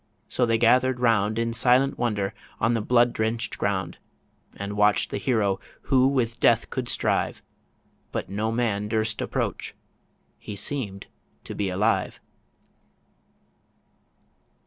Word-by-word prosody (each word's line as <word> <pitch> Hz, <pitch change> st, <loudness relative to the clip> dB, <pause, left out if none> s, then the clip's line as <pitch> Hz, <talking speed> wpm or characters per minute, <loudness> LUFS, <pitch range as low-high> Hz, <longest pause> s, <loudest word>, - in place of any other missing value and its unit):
so 125 Hz, -, 0 dB
they 115 Hz, 0 st, +2 dB
gathered 125 Hz, +2 st, +3 dB
round 110 Hz, -3 st, +2 dB
In 115 Hz, 0 st, 0 dB
silent 125 Hz, +4 st, +3 dB
wonder 105 Hz, -4 st, -1 dB, 0.3 s
on 115 Hz, +1 st, +2 dB
the 115 Hz, -, 0 dB
blood 120 Hz, +2 st, +3 dB
drench'd 110 Hz, 0 st, -2 dB
ground, 95 Hz, -4 st, -2 dB, 0.6 s
And 100 Hz, +1 st, -5 dB
watch'd 105 Hz, 0 st, +3 dB
the -, -, -2 dB
hero 105 Hz, -7 st, +1 dB, 0.2 s
who 130 Hz, -1 st, +3 dB
with 125 Hz, -4 st, 0 dB
Death 115 Hz, -1 st, +3 dB
could 125 Hz, -2 st, -3 dB
strive; -, -, 0 dB, 0.7 s
But -, -, -3 dB
no 105 Hz, +4 st, -2 dB
man 110 Hz, -3 st, -1 dB
durst 110 Hz, 0 st, -1 dB
approach... -, -, -3 dB, 0.6 s
He 105 Hz, -, -7 dB
seem'd 100 Hz, -3 st, -1 dB, 0.4 s
to -, -, -7 dB
be 100 Hz, -2 st, -2 dB
alive 95 Hz, +3 st, 0 dB
115 Hz, 125 wpm, -25 LUFS, 105-120 Hz, 0.7 s, gathered